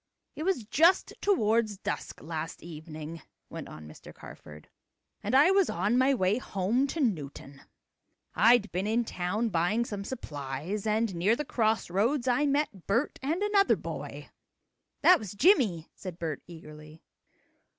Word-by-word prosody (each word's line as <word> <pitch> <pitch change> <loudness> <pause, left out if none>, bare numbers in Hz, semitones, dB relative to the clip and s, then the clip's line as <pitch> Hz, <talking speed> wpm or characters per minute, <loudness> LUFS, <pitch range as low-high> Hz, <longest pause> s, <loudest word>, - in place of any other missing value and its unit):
"It - - -7
was 350 -7 0
just 330 - +3
toward 230 - +2
dusk - - -4
last 160 0 -5
evening," 160 -1 -8 0.3
went - - -7
on 75 0 -10
Mr. 75 - -12
Carford, 75 0 -13 0.5
"and - - -1
I 290 +7 +6
was 390 -2 +3
on 200 +7 0
my 260 +2 +4
way 195 +1 +1
home 225 +5 0
to 320 - -5
Newton. 145 - -3 0.7
I'd 230 -1 +4
been 185 +4 -2
in 230 +2 +1
town 210 +5 -2
buying 200 +6 +1
some 205 -3 -5
supplies, 160 - -5
and 215 -1 +1
near 185 +6 +2
the 300 - -4
cross 220 -4 0
roads 235 +8 +1
I 255 +4 +2
met 280 - -1
Bert 235 +9 0
and 320 +9 -1
another 410 -1 +3
boy." - - -7 0.7
"That 365 - +7
was 205 -3 -7
Jimmie," 205 - +3
said 185 -3 -8
Bert 160 -3 -4
eagerly. 155 -2 -12
210 Hz, 150 wpm, -29 LUFS, 170-260 Hz, 0.7 s, That